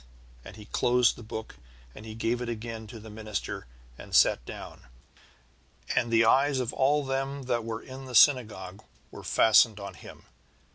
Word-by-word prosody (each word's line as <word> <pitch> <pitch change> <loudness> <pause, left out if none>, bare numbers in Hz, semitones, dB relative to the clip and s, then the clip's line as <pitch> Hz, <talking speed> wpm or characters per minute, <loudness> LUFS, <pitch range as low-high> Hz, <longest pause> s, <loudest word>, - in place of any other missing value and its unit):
"And - - -11
he 105 -1 -12
closed 120 +2 +2
the - - -12
book, 110 0 -8 0.4
and 110 - -11
he 110 - -8
gave 115 +2 -1
it 120 - -4
again 115 -1 -6
to 115 +1 -10
the 110 0 -11
minister, 105 - -5 0.3
and - - -6
sat - - +5
down. - - -10 1.1
And 120 -2 +1
the 115 0 +4
eyes 135 +4 +3
of 125 -2 -3
all 145 +2 +2
them 135 +1 -3
that 120 -2 -1
were 115 0 -5
in 130 +1 -10
the 125 -1 -7
synagogue 105 -7 +3 0.3
were - - -10
fastened 110 -1 +4
on 100 -1 -7
him. - - -13
115 Hz, 175 wpm, -28 LUFS, 110-130 Hz, 1.1 s, sat